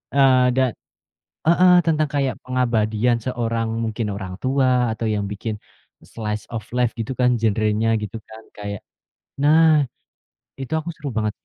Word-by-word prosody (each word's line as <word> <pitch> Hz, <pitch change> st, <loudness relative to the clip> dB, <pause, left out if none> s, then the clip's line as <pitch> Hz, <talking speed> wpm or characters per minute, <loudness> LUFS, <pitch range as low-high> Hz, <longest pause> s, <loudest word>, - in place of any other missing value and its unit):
Eee, 130 Hz, -2 st, +5 dB
dan 130 Hz, -2 st, +2 dB, 0.7 s
heeh 180 Hz, +2 st, +5 dB
tentang 155 Hz, -2 st, +1 dB
kayak 140 Hz, -2 st, -1 dB
pengabadian 120 Hz, -2 st, 0 dB
seorang, 115 Hz, -2 st, -2 dB, 0.2 s
mungkin 110 Hz, 0 st, -2 dB
orang 95 Hz, -1 st, -7 dB
tua, 130 Hz, -2 st, +2 dB
atau 115 Hz, -, -4 dB
yang 105 Hz, -2 st, -1 dB
bikin 105 Hz, +1 st, -5 dB, 0.4 s
slice 105 Hz, -2 st, -5 dB
of 110 Hz, -2 st, -5 dB
life 125 Hz, -1 st, 0 dB
gitu 115 Hz, +3 st, -3 dB
kan 125 Hz, -1 st, +2 dB
genrenya 110 Hz, 0 st, +1 dB
gitu, 105 Hz, +1 st, -6 dB
kan. 110 Hz, 0 st, -12 dB, 0.2 s
Kayak 100 Hz, -1 st, -6 dB, 0.6 s
nah, 155 Hz, 0 st, +5 dB, 0.7 s
itu 135 Hz, +3 st, -5 dB
aku 160 Hz, +2 st, -2 dB
seru 150 Hz, -3 st, -9 dB
banget. 110 Hz, -1 st, 0 dB
120 Hz, 140 wpm, -22 LUFS, 110-135 Hz, 0.7 s, Eee